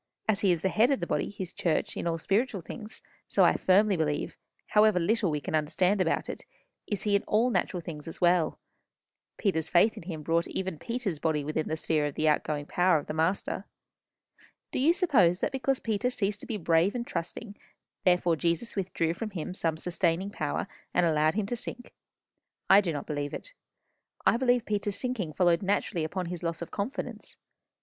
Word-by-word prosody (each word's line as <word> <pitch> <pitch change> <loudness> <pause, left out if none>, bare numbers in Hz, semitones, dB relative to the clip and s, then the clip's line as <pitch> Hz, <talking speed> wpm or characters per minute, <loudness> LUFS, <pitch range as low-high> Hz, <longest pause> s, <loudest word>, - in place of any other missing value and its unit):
As 215 -2 +2
he 195 - +4
is 170 -2 0
the 190 - +3
head 225 +6 +3
of 275 - +2
the - - -2
body, - - -1
his 190 -3 -6
church, 165 -3 -1
in - - -3
all 165 -1 0
spiritual 200 +4 0
things, 215 +6 -9 0.2
so - - +3
I - - +6
firmly 200 +2 +4
believe, 150 -3 -1 0.3
however 210 -3 +5
little 205 +3 +1
we 150 -1 -1
can 145 - -6
understand 180 +6 +2
about 165 - 0
it, - - -6 0.4
is 205 - -1
he 205 -1 +2
in 200 - +3
all 230 +4 +3
natural 180 -5 -1
things 155 -3 -8
as 165 - -7
well. 175 -3 +3 0.8
Peter's 160 -7 0
faith 205 +5 +4
in - - -6
him 160 -3 -6
brought 165 +2 +1
even 190 -5 -4
Peter's 230 -9 -3
body 155 -2 0
within 155 +2 -2
the 160 - -2
sphere 155 -2 +1
of 145 - -6
the 155 - +1
outgoing 150 -1 +1
power 180 +1 +3
of 145 - -4
the - - -4
Master. 165 +5 -1 1.1
Do - - -2
you 290 +6 +5
suppose 270 - +3
that - - 0
because 265 0 0
Peter 225 +2 0
ceased 205 -4 -2
to - - -8
be 225 -4 -2
brave 170 +2 +2
and 240 -1 -2
trusting, 205 +4 -5 0.5
therefore 180 -2 +3
Jesus 170 +7 -1
withdrew 175 -4 -1
from 215 +5 -5
him 180 -2 -5
some 165 -4 -1
sustaining 180 +2 0
power, 150 -7 -2 0.3
and 180 - +4
allowed 155 0 +2
him 215 -1 0
to 240 - -2
sink? 240 +1 -7 0.8
I 195 +2 +9
do 180 -4 -2
not 145 - -4
believe 145 -1 -3
it. - - -9 0.7
I - - +5
believe 245 -1 +2
Peter's 205 -1 -1
sinking 225 -11 -2
followed 175 -1 +3
naturally 195 -3 0
upon 180 +4 -3
his 175 0 -5
loss 170 -1 -3
of - - -10
confidence. 205 +7 -5
180 Hz, 200 wpm, -29 LUFS, 160-210 Hz, 1.1 s, I